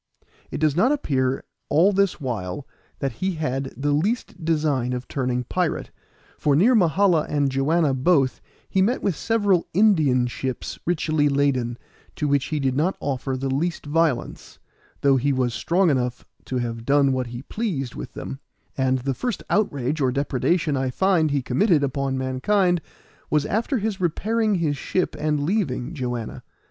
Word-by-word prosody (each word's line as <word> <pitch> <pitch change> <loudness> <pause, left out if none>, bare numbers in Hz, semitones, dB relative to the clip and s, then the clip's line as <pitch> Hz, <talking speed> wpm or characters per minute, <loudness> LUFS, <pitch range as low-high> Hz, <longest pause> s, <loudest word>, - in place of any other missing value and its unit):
It - - -4
does 150 -2 +2
not 225 - +3
appear 135 - 0 0.3
all 175 +7 +4
this 200 -2 +1
while 120 - -4 0.3
that 135 - -2
he 185 +12 -2
had 135 -3 -2
the 145 +1 0
least 185 +3 -1
design 150 -6 +1
of 125 0 -5
turning 125 -2 -1
pirate, 175 +5 -2 0.5
for 145 -2 +2
near 210 - +5
Mahala 180 - +3
and 145 -2 +1
Joanna 145 +2 +2
both 135 0 +2 0.3
he 190 - +1
met 230 +7 +1
with 195 - +1
several 205 -5 +1
Indian 155 - +4
ships 125 +1 -4
richly 155 -3 +1
laden, 135 -4 +1 0.4
to 150 - -1
which 140 -1 +2
he 155 - -2
did 135 -2 0
not 165 +7 +1
offer 135 -1 -2
the 135 +1 -3
least 170 +5 -2
violence, 150 -4 -1 0.4
though 140 -1 +4
he 140 +3 +1
was 130 -3 0
strong 175 - +2
enough 125 -2 -1 0.2
to 130 - -3
have 115 -2 -3
done 140 +1 +3
what 130 -1 -1
he 120 +2 -7
pleased 155 - -3
with - - -8
them; 135 - -6 0.4
and 130 -1 +1
the 135 +1 -1
first 240 - -3
outrage 150 - 0
or 130 -2 +2
depredation 145 +4 0
I 130 -1 0
find 170 +2 +2
he 140 -2 0
committed 150 - +2
upon 135 0 -1
mankind 175 +8 +1 0.5
was 150 -1 +2
after 230 - 0
his 210 -3 -2
repairing 215 +5 +1
his 155 -5 0
ship 185 +6 -1
and 150 -1 0
leaving 160 - -1
Joanna. 125 -6 -4
145 Hz, 165 wpm, -23 LUFS, 130-175 Hz, 0.5 s, near